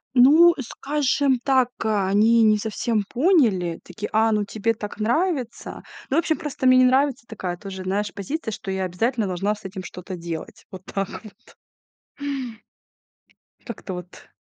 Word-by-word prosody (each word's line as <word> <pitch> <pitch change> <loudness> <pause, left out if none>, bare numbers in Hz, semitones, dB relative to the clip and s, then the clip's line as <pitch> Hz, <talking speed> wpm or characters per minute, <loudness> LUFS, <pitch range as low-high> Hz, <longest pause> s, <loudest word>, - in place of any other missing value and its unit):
Ну, 310 +8 +7
скажем 275 0 0
так, 260 -3 +3
они 215 +2 +3
не 215 -1 +5
совсем 220 0 -1
поняли. 235 - +2
Таки: 195 +4 -6
"А, 220 +1 +3
ну 210 -1 +1
тебе 220 +2 -1
так 210 0 -7
нравится". 255 - -1 0.3
Ну, 280 - +1
вообще, 325 -2 +2
просто 290 -5 -2
мне 255 0 +7
не 255 - +6
нравится 265 -1 +2
такая 185 -5 -5
тоже, 190 -1 -7
знаешь, 205 +2 -2
позиция, 220 - -4
что 200 -1 -7
я 190 0 -1
обязательно 220 +6 0
должна 195 +4 -1
с 210 - -17
этим 190 -1 -6
что-то 180 +1 -8
делать, 170 -2 -7
вот 185 -1 -9
так 195 -1 -3
вот. 215 - -16 2.1
Как-то 210 -5 -7
вот. 180 0 -10
220 Hz, 150 wpm, -23 LUFS, 195-255 Hz, 2.1 s, Ну